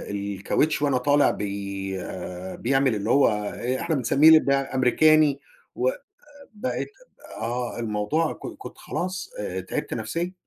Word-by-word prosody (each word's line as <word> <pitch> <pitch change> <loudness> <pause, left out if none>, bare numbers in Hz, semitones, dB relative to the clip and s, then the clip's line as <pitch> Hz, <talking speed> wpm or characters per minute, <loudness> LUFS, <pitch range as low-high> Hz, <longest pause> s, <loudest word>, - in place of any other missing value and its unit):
الكَاوتش 100 +10 0
وأنا 140 -3 +2
طالع 145 +3 +3
بي 100 -1 -4 0.6
بيعمل 135 -1 +2
اللي 105 +2 -3
هو 140 +2 +5
آآ 110 +4 -2
إحنا 165 -2 0
بنسميه 150 +5 +6
بأمريكاني، 140 +2 +3 0.4
و - - +2 0.7
بقيت 235 +5 -3 0.5
آه، 120 +1 -3
الموضوع 115 +8 0
ك - - -12 0.2
كنت - - -10
خلاص 185 - -4
آآ - - -3
تعبت - - -4
نفْسيًا، 175 +2 -3
130 Hz, 120 wpm, -25 LUFS, 105-155 Hz, 0.7 s, بنسميه